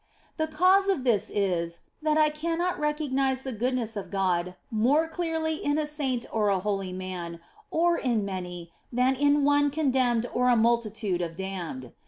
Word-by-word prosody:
The 315 -1 0
cause 370 +5 +4
of 370 -10 +1
this 235 -6 +2
is, 170 -4 -1 0.2
that 305 0 +2
I 305 -1 +5
cannot 335 +4 -1
recognise 275 -3 0
the 265 - -4
goodness 240 -1 -1
of 205 - -5
God 180 -2 0 0.2
more 265 +9 +3
clearly 320 -2 -2
in 290 +1 +1
a 310 - 0
saint 275 -5 -2
or 210 -2 +1
a 195 - +3
holy 195 -1 -2
man, 180 -2 -6 0.3
or 340 +1 +2
in 235 -6 0
many, 180 -3 -6 0.2
than 250 +2 +3
in 285 +2 +3
one 290 0 +4
condemned 260 -5 +1
or 250 0 +2
a 245 - +5
multitude 220 -5 +1
of 165 -1 -4
damned. 170 -10 -5
250 Hz, 170 wpm, -27 LUFS, 195-300 Hz, 0.3 s, I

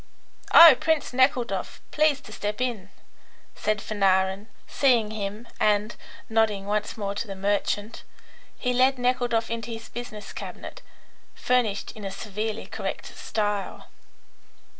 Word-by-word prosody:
"Oh, 330 -4 +11
Prince 320 -5 0
Nekhludoff! 245 -6 +1
Please 305 -2 +3
to 215 - -13
step 210 +1 -4
in," 235 -6 -2 0.6
said 215 -1 -1
Fanarin, 195 0 +1 0.2
seeing 240 -6 +2
him, 210 +2 -5
and, 210 +1 +2 0.3
nodding 220 -3 +1
once 210 +2 -2
more 200 -2 -3
to 210 +3 -4
the 195 - -6
merchant, 205 +2 -1 0.6
he 250 -1 -1
led 260 +2 +3
Nekhludoff 245 -2 0
into 230 0 -4
his 225 -1 -7
business 230 -3 -8
cabinet, - - -8 0.5
furnished 240 -5 0
in 215 - -11
a 195 - -3
severely 210 +2 -4
correct - - -6
style. 205 -2 -3
215 Hz, 125 wpm, -25 LUFS, 205-245 Hz, 0.6 s, Oh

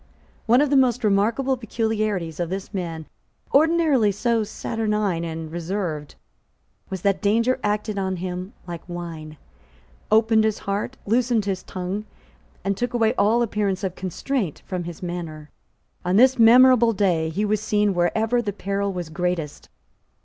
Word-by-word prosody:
One 240 +4 +5
of 295 -1 +1
the - - +4
most 250 -2 +2
remarkable 225 +6 +2
peculiarities 215 -7 -2
of 175 -1 -1
this 195 +3 -5
man, 165 -4 -4 0.5
ordinarily 300 -7 +4
so 225 +3 0
saturnine 210 -5 -2
and 160 -1 -5
reserved, 170 -3 -4 0.7
was 190 -2 -5
that 200 -2 +1
danger 230 +5 +2
acted 210 0 -1
on 190 -1 -1
him 180 +3 -5
like 170 -2 -6
wine, 165 -3 -7 0.7
opened 220 0 +4
his 215 -1 +1
heart, 205 +6 -3
loosened 230 0 +1
his 190 -2 -2
tongue, 190 +3 -5 0.6
and 195 0 0
took 245 +3 -2
away 225 -1 +3
all 235 0 +3
appearance 205 -3 -1
of 190 -2 -1
constraint 190 - -3
from 180 -2 -4
his 175 +1 -8
manner. 165 -4 -6 0.5
On 180 +1 0
this 260 +3 +5
memorable 240 0 +7
day 175 -6 +1
he 195 +7 -1
was 210 0 0
seen 210 -2 +1
wherever 220 +7 +1
the 205 -3 -3
peril 200 0 -2
was 175 -3 -5
greatest. 170 -3 -3
200 Hz, 150 wpm, -23 LUFS, 180-225 Hz, 0.7 s, memorable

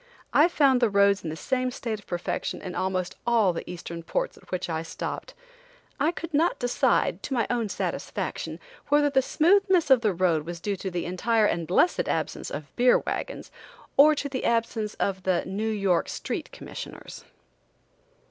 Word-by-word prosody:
I 305 - +6
found 275 -7 +3
the 235 - +4
roads 200 -1 +3
in 165 - -3
the 155 - -4
same 255 +8 -1
state 230 -3 -4
of 205 - -19
perfection 175 -1 -3
in 185 -2 -6
almost 185 -1 -2
all 225 -6 +4
the 165 - -6
Eastern 170 -1 -6
ports - - -2
at - - -19
which 185 0 -2
I 160 -2 -2
stopped. 165 - -6 0.6
I 320 - +3
could 335 -1 -7
not 325 +4 +2
decide, 245 0 +1
to 270 - -3
my 235 -3 +2
own 235 -3 0
satisfaction, - - -4 0.3
whether 290 0 +3
the 265 -1 +4
smoothness 360 +2 +3
of 260 -3 +7
the 210 -5 +1
road 170 -4 +2
was 170 +2 -6
due 200 +3 -2
to 190 0 -4
the 175 -1 -3
entire 215 +5 +1
and 170 -5 0
blessed 265 - +2
absence - - -2
of 145 -2 -7
beer 245 +1 +5
wagons, - - -5 0.4
or 300 +2 +7
to 285 - -2
the 270 -2 -4
absence 230 -2 0
of 190 -1 -1
the 185 -2 0
New 205 +4 -2
York 195 -5 +1
street - - -4
commissioners. - - -9
215 Hz, 180 wpm, -26 LUFS, 180-265 Hz, 0.6 s, of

